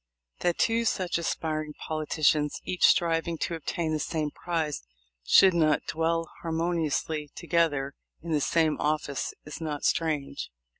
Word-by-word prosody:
That 175 -1 +1
two 230 0 +2
such 185 -6 0
aspiring 155 -2 -2
politicians, 155 -1 0
each 180 - +3
striving 165 0 +2
to 170 - -2
obtain 165 0 -2
the 155 - 0
same 155 -1 -2
prize, 160 -4 -2 0.4
should 190 - +6
not 155 -3 +3
dwell 165 +1 0
harmoniously 160 -3 -1
together 160 -5 0 0.3
in 170 - -5
the 150 -2 +2
same 160 +1 +2
office 150 -2 -1
is 150 +2 -8
not 150 -2 -3
strange. 150 -4 -1
160 Hz, 135 wpm, -28 LUFS, 150-170 Hz, 0.4 s, should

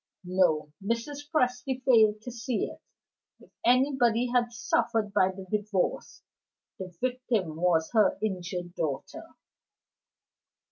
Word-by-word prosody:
(No: 175 -5 +1
Mrs. 280 +7 -3
Presty 255 -3 0
failed 220 -4 +4
to 245 - -6
see 235 0 -2
it; - - -10 0.6
if - - -20
anybody 245 -2 +3
had 240 -1 +2
suffered 225 -2 0
by 185 -3 +4
the 190 0 -8
Divorce, 205 -3 -2 0.6
the 190 - -5
victim 245 -9 -1
was 165 -2 +2
her 215 -2 +4
injured 180 -3 -4
daughter.) 150 -6 -5
220 Hz, 110 wpm, -28 LUFS, 185-250 Hz, 0.6 s, failed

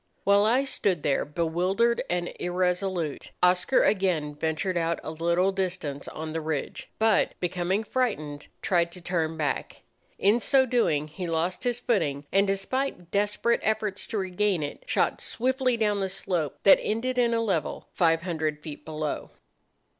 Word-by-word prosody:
While 200 +1 +5
I 245 +5 +3
stood 195 - 0
there 140 - +2
bewildered 180 +9 +1
and 175 0 -1
irresolute, 180 -2 -1
Oscar 180 +8 +4
again 180 -7 +1
ventured 160 +4 -1
out 170 -1 0
a - - -4
little 170 +4 +1
distance 180 -7 -3
on 155 0 -6
the 165 - -2
ridge, 155 -3 -4
but, 220 -1 +3
becoming 180 +3 0
frightened, 155 - -2 0.2
tried 170 -2 +2
to 180 - -9
turn 165 -2 -1
back. 150 -3 -3 0.3
In 205 +5 +3
so 265 +2 +4
doing 225 - +1
he 175 +4 -6
lost 170 +6 -1
his 245 -1 0
footing, 145 - 0
and, 195 +1 +3
despite 195 -1 -2
desperate 210 +3 +1
efforts 215 -2 -1
to 220 - -3
regain 190 -2 0
it, 145 - -5
shot - - +1
swiftly 255 0 0
down 210 -2 +1
the 190 -1 -1
slope 180 -5 -2
that 195 - +8
ended 250 +4 -1
in 235 -1 +3
a - - +1
level 190 -10 -1
five 165 -1 +2
hundred 160 -4 -2
feet 150 -3 -8
below. 155 -1 -4
180 Hz, 155 wpm, -27 LUFS, 160-210 Hz, 0.3 s, that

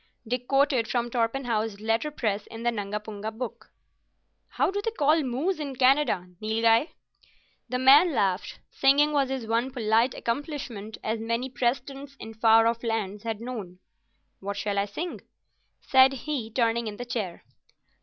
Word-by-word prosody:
Dick 250 +1 -3
quoted 270 -4 +2
from 240 -1 -1
Torpenhow's 230 -3 -1
letterpress 225 -1 -1
in 225 0 -9
the 240 - +2
Nungapunga 210 0 -4
Book. 235 +2 -7 0.8
"How - - 0
do 405 +1 -2
they 455 - -1
call 315 -6 +2
moose 290 +8 -1
in 280 -3 -4
Canada, 255 -8 +3
Nilghai?" 225 +4 +3 0.8
The 250 - -1
man 280 +7 +7
laughed. 195 -7 -1
Singing 285 +2 +4
was 275 -2 +2
his 265 -3 -3
one 230 +3 0
polite 230 -1 +1
accomplishment, 235 -5 -4
as 220 +1 -1
many 230 +3 -2
Press 245 0 +1
tents 275 +1 -10
in 225 - -8
far 225 0 +5
off 230 0 +1
lands 210 -3 -2
had 225 -2 -3
known. 215 -7 -6 0.6
"What 200 +1 -5
shall 205 -1 -1
I 200 - +1
sing?" 325 - -5 0.6
said 265 0 +5
he, 265 -3 -4
turning 230 0 0
in 210 -1 -6
the 245 - -6
chair. 215 -8 -4
235 Hz, 155 wpm, -27 LUFS, 220-270 Hz, 0.8 s, man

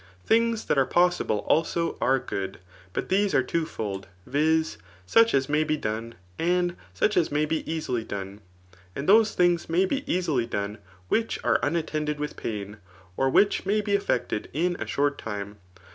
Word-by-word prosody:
Things 230 0 +2
that 140 - +2
are 135 - +3
possible, 175 - +2
also, 165 +1 +1
are 135 +1 +3
good; 95 -6 -4 0.3
but - - -3
these 200 +1 +2
aie 130 - +4
twofold, 110 - -3 0.2
viz. 160 +3 +1 0.3
such 230 - +4
as 135 -1 +2
may 150 +1 +2
be 155 0 0
done, 115 -1 -4 0.2
and 175 +1 +1 0.2
such 210 - +1
as 170 -4 +2
may 150 +1 +2
be 155 +1 -1
easily 130 -8 -2
done; 100 0 -6 0.5
and 140 - -4
those 220 +2 +5
things 175 -2 +2
may 175 +4 +3
be 270 +8 -1
easily 155 -10 0
done, 105 -1 -3 0.3
which 225 - 0
afe.imattended 155 -1 0
with 150 0 -4
pain, 105 -1 -5 0.4
or 135 +5 +2
which 200 +9 +3
may 210 +2 +2
be 205 -1 -1
effected 200 - 0
ia 175 +4 +2
a - - -4
short 145 0 0
time. 105 -1 -5
155 Hz, 165 wpm, -26 LUFS, 115-180 Hz, 0.5 s, those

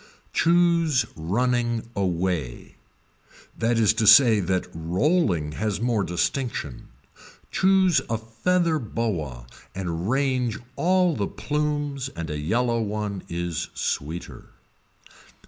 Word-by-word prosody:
Choose 170 -6 +3
running 120 +6 0
anyway, 90 - -2 0.8
that 115 +1 0
is 110 -2 +4
to 110 -1 0
say 110 0 +8
that 95 -1 0
rolling 85 - 0
has 105 +5 -2
more 115 -3 +1
distinction, 90 - -3 0.6
choose 190 -3 +3
a 115 - 0
feather 160 +10 0
boa 85 - -3 0.3
and 90 0 -3
range 130 -3 0 0.2
all 180 -1 +2
the 100 -2 -1
plumes 145 -2 -2
and 85 -1 -5
a 75 - -3
yellow 115 +9 0
one 105 -2 -3
is 85 -1 -3
sweeter. 80 +5 -4
110 Hz, 105 wpm, -24 LUFS, 90-140 Hz, 0.8 s, say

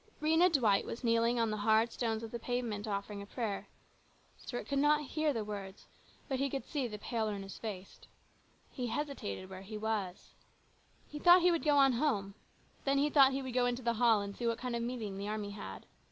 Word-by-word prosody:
Rhena 320 +4 +4
Dwight 225 -10 +3
was 235 - -7
kneeling 230 0 +3
right 235 - +2
on 225 - 0
the 215 - -2
hard 220 +2 +3
stones 225 -2 -2
of 225 - -7
the 235 - -4
pavement 230 -4 -3
offering 200 0 -3
a 200 - -9
prayer. 215 -3 -3 0.7
Stuart 245 - -6
could 280 -1 0
not 300 +1 +3
hear 310 +1 0
the 225 -5 -3
words, 200 -2 -7 0.4
but 265 -3 -2
he 275 +1 +1
could 270 0 -4
see 280 -5 -2
the 210 -2 -6
pale, 220 +1 -2
earnest 195 -2 -6
face. 200 -4 -7 0.7
He 250 -3 -3
hesitated 270 - -4
where 190 0 -9
he 210 +2 -7
was. 210 -4 -3 0.7
He 300 - -7
thought 350 +2 +7
he 355 - +6
would 335 - 0
go 295 -2 +4
on 270 -2 +6
home. 225 -7 0 0.5
Then 275 0 +2
he 290 +2 +2
thought 275 -2 +7
he 270 0 -2
would 260 -2 -5
go 245 0 +3
into 245 +1 -2
the 235 0 +1
hall 225 -4 +5
and 200 0 -6
see 240 - -2
what 230 -1 0
kind 250 -1 -3
of 235 - -2
a - - -2
meeting 215 -6 -4
the 200 - -4
army 210 -1 -3
had. 95 - -8
235 Hz, 225 wpm, -33 LUFS, 210-275 Hz, 0.7 s, thought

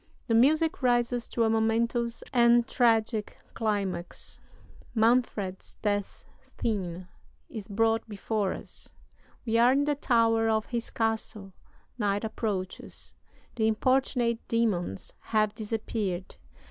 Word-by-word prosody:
The 230 - 0
music 305 +8 +3
rises 240 -1 +1
to 235 - 0
a 225 - +3
momentous 230 +1 0
and 235 -1 +5
tragic 225 -3 +1 0.2
climax. 195 -5 -3 0.6
Manfred's 220 -4 +1
death 205 -2 -2 0.3
scene 185 -5 -2 0.4
is 215 -4 -7
brought 225 +2 +1
before 205 -1 -1
us. - - -9 0.5
We 230 -1 +2
are 240 +2 +6
in 280 +1 +3
the 295 - +2
tower 230 -5 +2
of 220 0 +1
his 235 -2 -3
castle. 220 -3 -2 0.5
Night 205 -1 0
approaches. 205 -4 -4 0.4
The 220 -2 +2
importunate 240 0 +1
demons 200 - -1
have 215 -1 +1
disappeared. 210 -4 -3
225 Hz, 110 wpm, -28 LUFS, 205-235 Hz, 0.6 s, are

